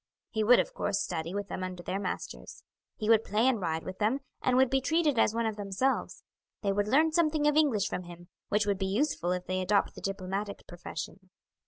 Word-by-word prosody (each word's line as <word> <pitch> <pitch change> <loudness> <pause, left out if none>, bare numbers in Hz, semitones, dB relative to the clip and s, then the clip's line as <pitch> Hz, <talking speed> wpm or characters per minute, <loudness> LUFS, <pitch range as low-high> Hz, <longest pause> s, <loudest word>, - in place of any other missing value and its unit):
He 220 - 0
would, 245 +3 +7
of - - -1
course, 200 - -1
study 165 +1 -3
with 205 -1 -3
them 185 - -4
under 180 -1 -5
their 190 - -2
masters. 195 - -6 0.3
He 215 - -3
would 225 -1 +5
play 220 +4 +2
and 245 -6 +2
ride 160 -2 -1
with 185 - -7
them, 225 +6 +1 0.2
and 255 -1 +2
would 260 -1 +4
be 270 0 +3
treated 300 -2 +2
as 220 - +3
one 230 0 +1
of 220 -1 -2
themselves. 205 +6 -1 0.4
They 200 - +2
would 205 +1 0
learn 310 +8 +4
something 310 -2 +2
of 295 - +3
English 270 -10 +3
from 180 - -4
him, 175 0 -11 0.2
which 210 0 +2
would 200 -2 0
be 190 - 0
useful 200 - 0
if 180 0 -2
they 185 0 -1
adopt 200 +2 +2
the - - -10
diplomatic 195 +1 -4
profession. 175 +1 -8
205 Hz, 220 wpm, -30 LUFS, 185-255 Hz, 0.4 s, would